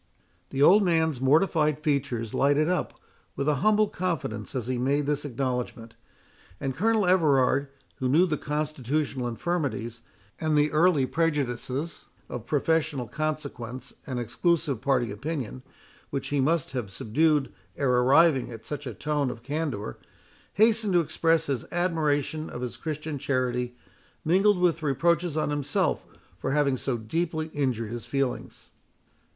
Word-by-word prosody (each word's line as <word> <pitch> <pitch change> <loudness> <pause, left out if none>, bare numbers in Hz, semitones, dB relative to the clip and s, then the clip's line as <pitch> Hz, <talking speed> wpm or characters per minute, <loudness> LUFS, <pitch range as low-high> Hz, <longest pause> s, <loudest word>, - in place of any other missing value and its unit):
The 135 +1 +1
old 200 +7 +7
man's 160 -7 +1
mortified 150 +1 +3
features 130 -7 -1
lighted 145 +2 +3
up 180 0 -1 0.4
with 140 - -2
a 150 -2 +3
humble 215 0 +4
confidence 155 - -3
as 125 -4 -2
he 125 0 -2
made 140 +3 +1
this 145 0 -1
acknowledgment; 125 -3 -3 0.7
and 135 -1 -3
Colonel 220 - +2
Everard, 145 -6 +3 0.3
who 130 - -1
knew 160 +7 +5
the 160 -4 0
constitutional 150 -3 -2
infirmities, 120 -4 -2 0.4
and 155 -1 +1
the 150 +1 +3
early 155 -3 +4
prejudices 145 -1 -2 0.2
of 120 -1 -6
professional 150 -3 0
consequence 140 -5 -4
and 130 -3 -3
exclusive 140 +2 0
party 125 -5 +1
opinion, 130 +2 -4 0.5
which 140 - -3
he 145 - 0
must 155 +1 +1
have 125 -6 -3
subdued 145 +7 +1 0.2
ere 135 -3 +1
arriving 135 +2 +4
at 115 -2 -10
such 145 -2 -5
a 120 - -6
tone 145 +2 -1
of 120 -1 -8
candour, 140 - -3 0.5
hastened 215 -1 +3
to 175 - +5
express 165 0 +1
his 135 -6 -2
admiration 155 -3 0
of 120 - -7
his 125 -1 -4
Christian 155 -2 -4
charity, 125 -2 -1 0.5
mingled 195 +5 +4
with 175 -2 +2
reproaches 165 +3 +1
on 155 - 0
himself 145 -2 0 0.4
for 135 - -2
having 140 -2 +2
so 130 -1 -2
deeply 160 +7 -2
injured 125 -6 -1
his 120 -1 -6
feelings. 135 0 -3
145 Hz, 140 wpm, -27 LUFS, 125-160 Hz, 0.7 s, old